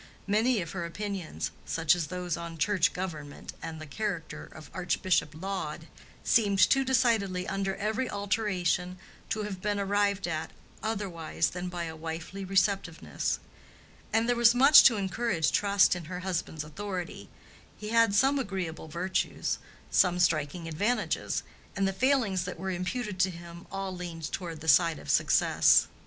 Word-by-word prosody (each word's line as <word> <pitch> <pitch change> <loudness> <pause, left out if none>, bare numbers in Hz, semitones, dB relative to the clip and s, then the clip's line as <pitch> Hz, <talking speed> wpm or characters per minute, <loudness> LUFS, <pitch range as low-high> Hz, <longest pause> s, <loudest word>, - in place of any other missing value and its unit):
Many 220 +2 +2
of 165 - -8
her 180 -3 -4
opinions, 170 - -4
such 165 -2 +2
as 170 -3 -2
those 180 -2 -3
on 170 -1 -7
church 180 +1 +2
government 155 -6 -6
and 165 -1 -6
the 155 - -7
character 190 +1 -4
of 155 - -12
Archbishop 180 -4 0
Laud, 170 -4 -4 0.4
seemed 205 -4 +3
too 270 +9 +5
decided 225 -8 +1
under 195 0 -1
every 220 +5 -1
alteration 190 -3 -1 0.3
to 215 - -1
have 195 -3 -5
been 205 0 -1
arrived 200 -1 +1
at 160 -2 -3 0.3
otherwise 190 -7 -2
than 180 0 -4
by 175 -1 -4
a 160 -1 -5
wifely 165 +4 -6
receptiveness. 185 - 0 0.7
And 225 +1 +2
there 245 - +2
was 235 0 +5
much 275 +4 +9
to 235 -4 +6
encourage 190 -3 0
trust 200 -2 +4
in 175 -2 -6
her 180 +2 -6
husband's 175 -4 -3
authority. 185 +3 -6 0.5
He 210 - -6
had 230 -2 +4
some 270 +6 +4
agreeable 185 -9 -4
virtues, 175 +4 -2 0.3
some 180 -1 +4
striking 165 -1 +1
advantages, 205 +10 -1 0.3
and 195 -1 +1
the 195 - -1
failings 220 -6 +1
that 180 - -5
were 190 +2 -3
imputed 185 +3 -3
to 185 - +4
him 170 0 -10
all 195 -1 -4
leaned 170 -3 -6
toward 165 -4 -5
the 160 - -8
side 165 0 +5
of - - -4
success. - - +4
185 Hz, 155 wpm, -29 LUFS, 170-205 Hz, 0.7 s, much